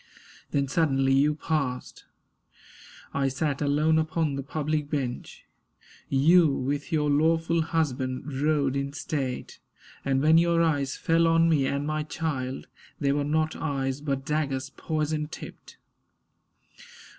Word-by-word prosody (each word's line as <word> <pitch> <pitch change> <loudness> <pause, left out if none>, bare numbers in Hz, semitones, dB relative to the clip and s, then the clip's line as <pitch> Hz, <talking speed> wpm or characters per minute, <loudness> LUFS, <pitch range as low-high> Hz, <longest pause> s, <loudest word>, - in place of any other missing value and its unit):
Then 140 -1 0
suddenly 135 -3 +2
you 145 +3 +3
passed. 140 -5 -3 1.1
I 140 -1 +1
sat 140 +2 -1
alone 150 +2 +3
upon 155 -1 0
the 140 - -3
public 150 +1 -2
bench; 130 -5 -4 0.6
You, 160 +5 +5
with 145 +5 -3
your 150 -2 +1
lawful 165 +3 +2
husband, 140 -4 -2
rode 145 -3 +1
in 140 0 -2
state; 135 -3 -4 0.4
And 135 -1 +1
when 160 +2 +6
your 170 0 +3
eyes 145 -4 0
fell 165 0 +2
on 165 0 +4
me 145 -5 +2
and 140 +1 -1
my 155 0 -1
child, 145 -4 -3 0.3
They 140 -2 +1
were 145 +1 +1
not 155 +2 0
eyes, 135 -2 -2
but 135 -2 -2
daggers, 140 -3 -1
poison 155 -1 -2
tipped. - - -11
145 Hz, 130 wpm, -27 LUFS, 135-160 Hz, 1.1 s, when